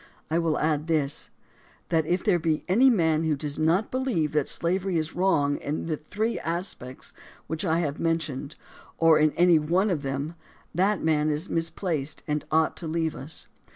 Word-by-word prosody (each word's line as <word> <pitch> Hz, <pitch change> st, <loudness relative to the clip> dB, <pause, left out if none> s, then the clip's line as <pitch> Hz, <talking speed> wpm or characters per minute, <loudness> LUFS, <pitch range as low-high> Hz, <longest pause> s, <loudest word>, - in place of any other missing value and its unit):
I 165 Hz, -, +2 dB
will 165 Hz, -2 st, +1 dB
add 155 Hz, 0 st, 0 dB
this: 150 Hz, -4 st, 0 dB, 0.6 s
that 160 Hz, -2 st, +1 dB
if 180 Hz, +2 st, 0 dB
there 190 Hz, -5 st, +3 dB
be 155 Hz, -1 st, 0 dB
any 235 Hz, +9 st, +5 dB
man 160 Hz, -8 st, +2 dB
who 160 Hz, -2 st, +1 dB
does 145 Hz, +1 st, -3 dB
not 170 Hz, +7 st, +2 dB
believe 250 Hz, -, 0 dB
that 150 Hz, -2 st, +1 dB
slavery 185 Hz, +1 st, +1 dB
is 155 Hz, 0 st, -2 dB
wrong 145 Hz, -6 st, +2 dB
in 150 Hz, +2 st, -4 dB
the 160 Hz, -2 st, -2 dB
three 215 Hz, +10 st, -2 dB
aspects 165 Hz, -7 st, -5 dB, 0.3 s
which 160 Hz, -1 st, -4 dB
I 170 Hz, -2 st, +1 dB
have 145 Hz, -3 st, -3 dB
men 165 Hz, 0 st, +2 dB
tioned, 145 Hz, -2 st, -6 dB, 0.4 s
or 165 Hz, -1 st, +5 dB
in 155 Hz, 0 st, +4 dB
any 175 Hz, -2 st, +5 dB
one 180 Hz, +7 st, +1 dB
of 160 Hz, -5 st, -1 dB
them, 140 Hz, +3 st, -3 dB, 0.4 s
that 190 Hz, +3 st, +1 dB
man 155 Hz, -1 st, +2 dB
is 155 Hz, +5 st, -2 dB
misplaced 165 Hz, -3 st, -2 dB
and 150 Hz, -1 st, -1 dB
ought 160 Hz, 0 st, +2 dB
to 170 Hz, -, -6 dB
leave 160 Hz, 0 st, -1 dB
us. 145 Hz, +4 st, -5 dB
160 Hz, 185 wpm, -26 LUFS, 150-175 Hz, 0.6 s, any